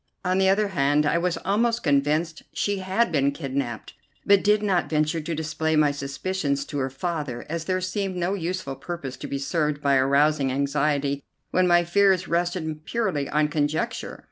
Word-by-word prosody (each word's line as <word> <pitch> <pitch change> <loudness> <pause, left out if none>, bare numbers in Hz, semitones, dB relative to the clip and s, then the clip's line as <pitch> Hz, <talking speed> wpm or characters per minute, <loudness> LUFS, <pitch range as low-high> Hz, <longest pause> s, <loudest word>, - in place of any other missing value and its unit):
On 185 +1 +2
the 190 0 +4
other 200 +1 +2
hand 145 -3 +2
I 160 +3 +2
was 175 0 0
almost 230 +4 +1
convinced 150 +2 +1
she 205 -1 -1
had 190 +3 +1
been 140 -3 +2
kidnapped, 135 -5 -4 0.3
but 200 -1 +5
did 210 0 +3
not 190 -4 +1
venture 155 +1 +1
to 165 +2 -3
display 160 0 -1
my 150 -1 +4
suspicions 140 +1 -2
to 145 - -4
her 135 0 -1
father, 145 -3 -4
as 165 +1 -4
there 185 0 0
seemed 185 +1 -2
no 180 +2 -1
useful 180 -6 -3
purpose 145 -5 -6
to - - -7
be 140 - -3
served 150 +1 -1
by 140 -2 +3
arousing 140 +1 +3
anxiety 140 +1 0 0.3
when 185 0 +3
my 175 0 +5
fears 190 +1 +3
rested 170 -3 -1
purely 185 -9 -1
on 150 0 +2
conjecture. 150 0 -2
160 Hz, 175 wpm, -25 LUFS, 140-185 Hz, 0.3 s, but